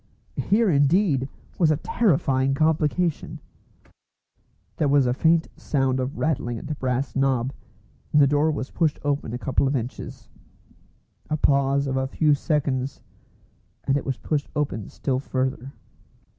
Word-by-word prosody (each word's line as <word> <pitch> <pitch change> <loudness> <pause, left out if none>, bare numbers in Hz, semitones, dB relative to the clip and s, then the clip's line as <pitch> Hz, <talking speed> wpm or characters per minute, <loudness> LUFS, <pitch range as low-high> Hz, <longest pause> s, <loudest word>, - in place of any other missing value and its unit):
Here 220 +2 +3
indeed 145 -1 +2 0.3
was 165 -4 +4
a 155 - +2
terrifying 135 - +1
complication! 160 +2 0 1.4
There 150 - +1
was 140 -1 +4
a 125 - +1
faint 160 +4 +2
sound 135 -2 0
of 130 +4 -3
rattling 120 -6 -1
at - - -8
the 150 - -3
brass 130 -1 -2
knob, 135 -1 +1 0.6
and 150 - +4
the 145 - +7
door 145 +3 +2
was 145 -3 -3
pushed 160 -4 +1
open 145 -5 -1
a 120 - -3
couple 130 +2 0
of 140 - 0
inches. 125 0 -5 1.0
A 155 - 0
pause 140 -1 +2
of 135 -1 -1
a 130 0 0
few 150 +2 +2
seconds, 140 -3 -1 0.8
and 135 - +1
it 145 - -1
was 135 -2 -3
pushed 150 -2 -2
open 135 -9 -2
still 130 -2 -2
further. 130 -1 -3
140 Hz, 145 wpm, -24 LUFS, 130-150 Hz, 1.4 s, the